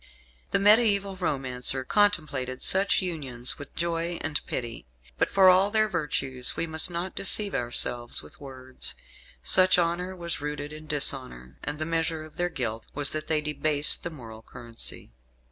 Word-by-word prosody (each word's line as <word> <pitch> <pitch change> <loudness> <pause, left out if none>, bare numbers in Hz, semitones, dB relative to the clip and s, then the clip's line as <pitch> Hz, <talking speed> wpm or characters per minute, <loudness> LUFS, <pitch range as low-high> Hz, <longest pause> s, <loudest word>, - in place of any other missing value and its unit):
The - - +2
mediaeval 200 -2 +3
romancer 130 -6 -1
contemplated 145 -9 0
such 195 +1 +3
unions 135 -9 0
with 145 - -10
joy 170 0 -2
and 155 -3 -3
pity; 115 - -5 0.3
but - - +1
for 195 -1 +4
all 185 +2 +5
their 215 0 +2
virtues 135 -8 -1
we - - -1
must 160 +1 +4
not 175 +2 -4
deceive 200 +1 +1
ourselves 120 -2 0
with 75 - -15
words. 130 -2 -3 0.5
Such 185 - +5
honour 175 +2 -1
was 170 -4 -3
rooted 150 0 -5
in 155 0 -11
dishonour, 130 - -1
and 145 0 -2
the 155 - -3
measure 165 -1 -2
of 155 - -16
their 175 0 0
guilt 115 -8 -4
was 145 -1 0
that 155 0 -4
they 155 -1 +1
debased 150 0 +3
the - - -5
moral 115 -8 -11
currency. 115 - -7
155 Hz, 160 wpm, -26 LUFS, 130-175 Hz, 0.5 s, all